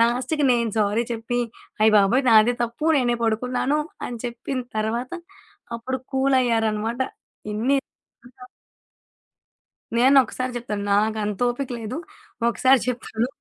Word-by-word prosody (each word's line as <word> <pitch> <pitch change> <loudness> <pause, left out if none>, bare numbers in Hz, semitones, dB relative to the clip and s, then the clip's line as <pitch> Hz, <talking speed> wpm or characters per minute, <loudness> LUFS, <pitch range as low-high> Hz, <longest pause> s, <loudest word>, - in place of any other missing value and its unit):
లాస్ట్‌కి 250 +6 +1
నేను 235 -2 +1
సారీ 210 +3 +1
చెప్పి, 235 +2 -2 0.4
అయ్య 215 0 +5
బాబోయ్! 225 +7 +4
నాదే 225 +2 +6
తప్పు 235 +7 -5
నేనే 240 -2 +1
పడుకున్నాను 250 +6 0 0.3
అని 240 -1 -6
చెప్పిన 245 +2 -4 0.2
తర్వాత, 235 +5 -2 0.6
అప్పుడు 260 +3 -4
కూలయ్యారనమాట. 235 -4 +1 0.5
ఇన్ని 255 +6 +1 0.6
ఆ! - - -8 1.5
నేనొక్కసారి 255 0 +3
చెప్తాను. 210 -4 -4
నాకంత 210 -1 +1
ఓపిక 260 +2 -4
లేదు. 225 +6 -5 0.5
ఒకసారి 260 +2 +4
చెప్తాను. 235 -1 -2
240 Hz, 105 wpm, -23 LUFS, 220-255 Hz, 1.5 s, నాదే